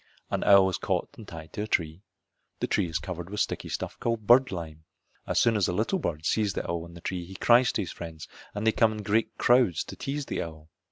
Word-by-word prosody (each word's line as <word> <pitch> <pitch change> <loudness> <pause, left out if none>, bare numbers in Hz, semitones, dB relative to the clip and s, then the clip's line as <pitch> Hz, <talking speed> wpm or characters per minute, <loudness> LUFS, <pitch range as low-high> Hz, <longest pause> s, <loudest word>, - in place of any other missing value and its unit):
An - - 0
owl 100 -1 +7
is 90 -4 -2
caught - - -1
and 110 - -12
tied 80 -1 -10
to 105 - -3
a 105 - -3
tree. 80 -3 -1 0.6
The - - 0
tree - - +1
is 80 - -1
covered 90 -1 -6
with 105 +1 -4
sticky - - -1
stuff - - -4
called 115 -2 -2
bird 125 +3 +6
lime. 80 -4 -6 0.4
As - - +2
soon 115 -1 +4
as 100 -3 +2
a - - -1
little 115 - 0
bird 80 - -3
sees 105 0 +1
the - - -3
owl 85 0 -3
in 85 - -14
the 85 - -11
tree 90 0 -3
he 95 +3 -11
cries 120 +5 +5
to 105 - 0
his 90 - -6
friends 80 -2 -8 0.3
and 105 +1 -3
they 110 - +5
come 110 0 +3
in 105 -1 -6
great 110 +3 0
crowds 120 -8 +3
to - - -9
tease 140 +1 -4
the - - -3
owl. 80 -1 -8
95 Hz, 255 wpm, -27 LUFS, 85-110 Hz, 0.6 s, owl